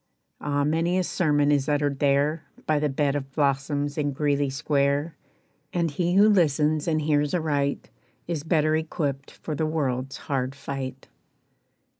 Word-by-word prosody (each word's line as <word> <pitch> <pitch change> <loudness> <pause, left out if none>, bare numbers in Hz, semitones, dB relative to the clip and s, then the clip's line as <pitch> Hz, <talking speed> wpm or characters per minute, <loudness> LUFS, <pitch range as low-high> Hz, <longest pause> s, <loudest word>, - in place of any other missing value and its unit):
Ah, 145 -1 0
many 165 +4 +1
a 185 - +2
sermon 150 -5 +2
is 145 -1 +1
uttered 145 -2 0
there 145 +3 +1 0.2
By 155 -1 +2
the 150 0 0
bed 140 +1 0
of 135 -1 -4
blossoms 145 +1 0
in 145 -1 0
Greeley 145 0 +1
square. 140 +2 0 0.6
And 170 -3 0
he 175 +4 0
who 205 +2 +7
listens 155 -6 +2
and 155 -2 +1
hears 150 0 +1
aright, 145 -4 -1 0.4
Is 165 -4 -2
better 155 0 +2
equipped 145 -4 -2
for 155 - -7
the 155 +2 -1
world's 135 -4 -2
hard 135 -1 -2
fight. 135 -1 -6
145 Hz, 150 wpm, -25 LUFS, 140-155 Hz, 0.6 s, who